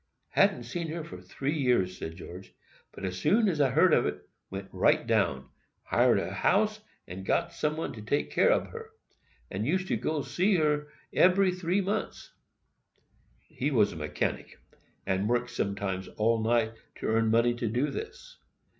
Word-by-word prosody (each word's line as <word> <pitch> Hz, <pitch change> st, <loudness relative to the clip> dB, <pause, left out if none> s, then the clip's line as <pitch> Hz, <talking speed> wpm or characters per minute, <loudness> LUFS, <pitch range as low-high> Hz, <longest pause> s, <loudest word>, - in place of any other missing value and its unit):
]—"Hadn't 120 Hz, -, +3 dB
seen 165 Hz, +8 st, -4 dB
her 160 Hz, +1 st, -4 dB
for 90 Hz, -10 st, -10 dB
tree 135 Hz, -, -3 dB
years," 120 Hz, -10 st, +1 dB
said 80 Hz, -, -6 dB
George; 90 Hz, +3 st, -11 dB, 0.4 s
"but 95 Hz, -1 st, -5 dB
soon 210 Hz, -, +2 dB
as 160 Hz, -6 st, +1 dB
I 135 Hz, -, +4 dB
heard 160 Hz, +6 st, +4 dB
of -, -, +4 dB
it, -, -, -6 dB, 0.2 s
went 95 Hz, 0 st, -6 dB
right -, -, +2 dB
down,—hired 65 Hz, 0 st, 0 dB
a -, -, -4 dB
house, 215 Hz, +1 st, +2 dB, 0.3 s
and 95 Hz, +2 st, -7 dB
got -, -, 0 dB
some 150 Hz, 0 st, -1 dB
one 160 Hz, -3 st, -3 dB
to 110 Hz, -, -9 dB
take 125 Hz, +7 st, -1 dB
care -, -, +4 dB
ob -, -, 0 dB
her,—and 445 Hz, -, -9 dB
used 185 Hz, +4 st, 0 dB
to -, -, +2 dB
go 155 Hz, -2 st, -2 dB
to -, -, -11 dB
see 190 Hz, +3 st, +2 dB
her 150 Hz, -3 st, +1 dB, 0.3 s
ebery 185 Hz, +1 st, +4 dB
tree 180 Hz, +2 st, 0 dB
months." 200 Hz, +3 st, -3 dB, 1.1 s
He 135 Hz, -, -4 dB
is 110 Hz, -8 st, +3 dB
a -, -, -9 dB
mechanic, 75 Hz, -1 st, -3 dB, 0.5 s
and 95 Hz, +3 st, 0 dB
worked 120 Hz, 0 st, 0 dB
sometimes 100 Hz, -4 st, -2 dB
all 115 Hz, +1 st, +1 dB
night 115 Hz, 0 st, +1 dB, 0.2 s
to -, -, -7 dB
earn 115 Hz, 0 st, +2 dB
money 115 Hz, +2 st, +3 dB
to 120 Hz, -1 st, -3 dB
do 125 Hz, +7 st, 0 dB
this. -, -, -8 dB
125 Hz, 170 wpm, -29 LUFS, -, 1.1 s, I